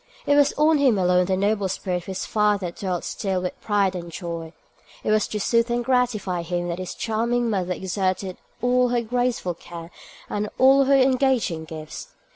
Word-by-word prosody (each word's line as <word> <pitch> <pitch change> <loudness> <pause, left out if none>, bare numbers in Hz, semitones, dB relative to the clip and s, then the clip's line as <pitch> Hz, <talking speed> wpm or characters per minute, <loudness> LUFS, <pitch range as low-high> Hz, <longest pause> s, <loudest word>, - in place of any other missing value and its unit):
It 285 - +3
was 290 0 +5
on 305 0 +3
him 260 -7 +4
alone 180 -1 +3
the 190 -1 +1
noble 200 0 +1
spirit 185 -1 -2
of 175 - -8
his 190 -1 -4
father 210 -4 +1
dwelt 180 -1 -3
still 190 -2 -2
with 180 - -5
pride 200 -3 +1
and 170 -1 -6
joy: 165 -2 -6 0.5
it - - 0
was 215 -1 +2
to 210 - -4
soothe 230 +3 +2
and 240 0 -1
gratify 230 -8 0
him 175 +1 -3
that 170 +1 -3
his 185 - -5
charming 235 +1 0
mother 185 -3 -1
exerted 185 0 -2 0.3
all 250 0 +3
her 240 -1 +1
graceful 245 -5 -1
care 170 0 -10 0.4
and 210 0 -2
all 270 +1 +6
her 275 +1 +4
engaging 255 -10 +2
gifts. 155 -1 -8
200 Hz, 185 wpm, -23 LUFS, 180-245 Hz, 0.5 s, all